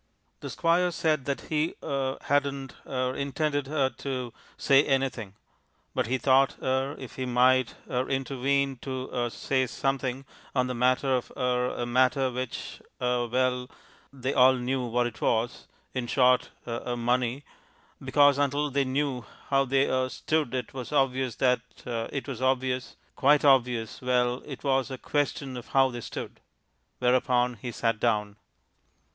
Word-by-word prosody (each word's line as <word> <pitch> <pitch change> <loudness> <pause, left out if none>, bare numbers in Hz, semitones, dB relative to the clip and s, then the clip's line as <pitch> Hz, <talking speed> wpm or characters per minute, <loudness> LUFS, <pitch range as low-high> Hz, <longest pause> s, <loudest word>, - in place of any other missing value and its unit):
The - - -6
Squire 175 +1 +2
said 155 -5 0
that 140 -1 -2
he 155 +1 -1
er 135 -1 -1
hadn't 140 -2 0
er 130 0 -1
intended 145 0 -1
er 140 -3 +1
to 130 -4 -4 0.2
say 140 +1 +5
anything. 130 -8 -1 0.6
But - - 0
he 130 +3 +1
thought 135 +1 +3
er 130 +2 -1
if 130 - -10
he 130 -1 -2
might 125 0 +3
er 125 +1 -1
intervene 135 0 0
to 130 +1 -5
er 120 -1 0
say 130 +2 0
something 135 0 -2 0.3
on 125 -1 +3
the 125 - -3
matter 130 +2 +2
of 125 - -6
er 125 -1 0
a 120 - -1
matter 130 +2 +2
which 125 0 -5 0.2
er 125 -1 0
well, 125 +1 0 0.4
they 135 0 -3
all 130 +1 +6
knew 130 +1 -1
what 120 +1 +1
it 120 -2 -6
was 115 +1 0 0.3
in 125 -2 -2
short 125 0 +3 0.2
er 120 +1 -3
money. 125 +3 0 0.6
Because 145 -1 +4
until 145 +1 +1
they 140 0 +1
knew 130 -1 -1 0.3
how 135 0 +3
they 135 +1 +2
er 130 0 0
stood, 150 -2 -1
it 125 - -4
was 130 -2 -6
obvious 130 -3 +1
that 125 -2 +2 0.2
it 120 +4 -3
was 130 -3 -5
obvious 130 -1 0 0.2
quite 145 +1 +4
obvious 125 -5 +2
well 125 0 +1
it 140 -4 -8
was 135 -1 +1
a 130 - -5
question 140 -1 -2
of 120 - -8
how 135 -1 +3
they 120 -1 -6
stood. - - -7 0.6
Whereupon 125 0 +2
he 125 - -4
sat 115 -1 -1
down. 105 -1 0
130 Hz, 155 wpm, -27 LUFS, 125-135 Hz, 0.6 s, all